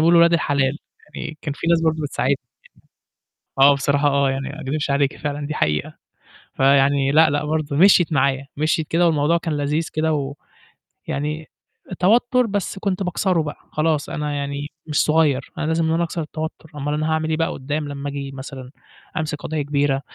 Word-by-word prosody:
بيقولوا 170 Hz, +2 st, +5 dB
ولاد 170 Hz, 0 st, +5 dB
الحلال 145 Hz, -3 st, +1 dB, 0.4 s
يعني، 155 Hz, -1 st, -6 dB
كان 145 Hz, -, -3 dB
في -, -, -5 dB
ناس 170 Hz, -1 st, +4 dB
برضه 160 Hz, -1 st, +2 dB
بتساعدني. 135 Hz, -1 st, 0 dB, 1.2 s
آه، 140 Hz, +1 st, +7 dB
بصراحة 140 Hz, +1 st, +1 dB
آه، 140 Hz, -1 st, +2 dB
يعني 135 Hz, +1 st, -3 dB
ما 155 Hz, +3 st, -8 dB
أكدبش 145 Hz, +1 st, -2 dB
عليكِ 140 Hz, 0 st, +1 dB
فعلًا 145 Hz, -1 st, -4 dB
دي 155 Hz, -, -4 dB
حقيقة. 75 Hz, -, -1 dB, 0.6 s
فيعني 135 Hz, 0 st, +3 dB
لأ، 160 Hz, +1 st, +6 dB
لأ، 145 Hz, +1 st, -1 dB
برضه 155 Hz, -2 st, -1 dB
مشيِت 175 Hz, 0 st, +5 dB
معايا، 135 Hz, 0 st, +1 dB
مشيِت 155 Hz, 0 st, 0 dB
كده، 175 Hz, +1 st, +2 dB
والموضوع 160 Hz, +1 st, +2 dB
كان 165 Hz, -3 st, -3 dB
لذيذ 150 Hz, +3 st, -1 dB
كده، 150 Hz, -3 st, -1 dB, 0.7 s
ويعني 150 Hz, +2 st, -3 dB, 0.5 s
توتر 240 Hz, +6 st, +3 dB
بس 200 Hz, -2 st, -3 dB
كنت 195 Hz, -1 st, -1 dB
باكسره 180 Hz, -1 st, +1 dB
بقى 150 Hz, -, -6 dB
خلاص، 155 Hz, -1 st, 0 dB
أنا 150 Hz, -1 st, -3 dB
يعني 140 Hz, 0 st, -3 dB, 0.2 s
مش 150 Hz, -2 st, +1 dB
صغيّر، 150 Hz, -4 st, +2 dB
أنا -, -, -2 dB
لازم 160 Hz, +1 st, +1 dB
إن 160 Hz, -, +1 dB
أنا 170 Hz, -, +1 dB
أكسر 170 Hz, 0 st, -3 dB
التوتر، 155 Hz, +1 st, -6 dB
أمّال 145 Hz, +1 st, -2 dB
أنا 155 Hz, +1 st, -1 dB
هاعمل 160 Hz, 0 st, 0 dB
إيه 155 Hz, -, 0 dB
بقى 165 Hz, -, +1 dB
قدّام 145 Hz, +2 st, -3 dB
لمّا 140 Hz, 0 st, -5 dB
أجي 140 Hz, -1 st, -5 dB
مثلًا 130 Hz, -1 st, -9 dB, 0.5 s
أمسك 155 Hz, -1 st, -2 dB
قضية 155 Hz, -1 st, -2 dB
كبيرة، 140 Hz, -1 st, 0 dB
150 Hz, 180 wpm, -21 LUFS, 140-160 Hz, 1.2 s, آه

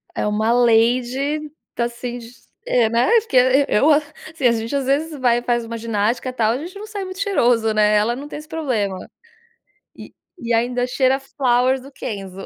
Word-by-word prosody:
É -, -, -1 dB
uma 215 Hz, +2 st, 0 dB
lady, 245 Hz, +5 st, +2 dB, 0.3 s
tá 235 Hz, -, 0 dB
assim, 240 Hz, +1 st, -6 dB, 0.5 s
é 240 Hz, -, +2 dB
né, 235 Hz, +1 st, +2 dB, 0.6 s
eu, 285 Hz, +9 st, +3 dB
assim 300 Hz, 0 st, -2 dB
a 235 Hz, -, +4 dB
gente 230 Hz, +3 st, -3 dB
às 275 Hz, -1 st, -1 dB
vezes 295 Hz, +3 st, -1 dB
vai 245 Hz, -2 st, +3 dB
e -, -, -9 dB
faz 240 Hz, -1 st, 0 dB
uma 230 Hz, 0 st, -6 dB
ginástica 230 Hz, +3 st, -1 dB
tal, 230 Hz, -1 st, +1 dB
gente 340 Hz, +7 st, -8 dB
não 425 Hz, +2 st, -8 dB
sai 410 Hz, -3 st, -5 dB
muito 370 Hz, +1 st, -8 dB
cheiroso, 240 Hz, -, +2 dB
né, 210 Hz, 0 st, +3 dB
ela 220 Hz, +3 st, +2 dB
não 280 Hz, +3 st, -8 dB
tem 295 Hz, -, -7 dB
esse 305 Hz, -, -13 dB
problema. 245 Hz, -12 st, -2 dB, 1.4 s
E 235 Hz, 0 st, -1 dB
ainda 245 Hz, +2 st, 0 dB
cheira 260 Hz, +1 st, +2 dB
a 270 Hz, -, -10 dB
Flowers 260 Hz, -1 st, +1 dB
do 275 Hz, +2 st, -13 dB
Kenzo. 195 Hz, -7 st, -7 dB
245 Hz, 180 wpm, -20 LUFS, 230-280 Hz, 1.4 s, a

